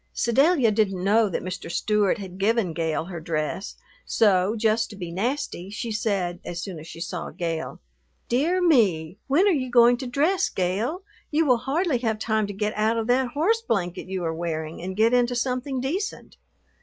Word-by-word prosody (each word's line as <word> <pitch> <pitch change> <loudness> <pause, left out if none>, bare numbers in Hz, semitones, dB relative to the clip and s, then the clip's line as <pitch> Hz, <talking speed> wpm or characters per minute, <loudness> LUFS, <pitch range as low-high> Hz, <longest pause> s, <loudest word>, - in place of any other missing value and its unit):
Sedalia 270 +1 +3
didn't 195 -4 0
know 210 +2 +3
that - - -3
Mr. 185 -1 -5
Stewart 210 +3 +1
had 190 -2 -9
given 210 -3 +1
Gale 160 -1 -1
her 175 -2 -6
dress, 160 +3 -3 0.3
so, 200 -1 +2
just 220 +1 +1
to 210 - -10
be 175 -4 -6
nasty, 205 -1 -3
she 220 +3 -4
said, 195 -5 -1
as 175 - -5
soon 175 -2 -6
as 155 - -11
she 165 - -10
saw 175 0 -4
Gale, 165 -2 -4 0.5
"Dear 330 +10 +1
me, 200 - +2
when 300 +9 +4
are 405 - +5
you 265 -6 -1
going 240 0 +6
to 255 - -5
dress, 320 +9 +1
Gale? 210 - -1 0.3
You 315 +2 +2
will 250 -4 +4
hardly 275 +2 0
have 225 -3 -1
time 220 -1 0
to - - -5
get 210 +2 -2
out 220 +2 +1
of 225 - -1
that 250 0 +2
horse 400 +11 +2
blanket 185 - -2
you 185 -1 -3
are 165 -1 -1
wearing 160 -1 -4
and 190 +2 -5
get 225 +2 +4
into 245 0 +2
something 255 +2 -1
decent." 340 +11 -4
215 Hz, 190 wpm, -25 LUFS, 180-255 Hz, 0.5 s, going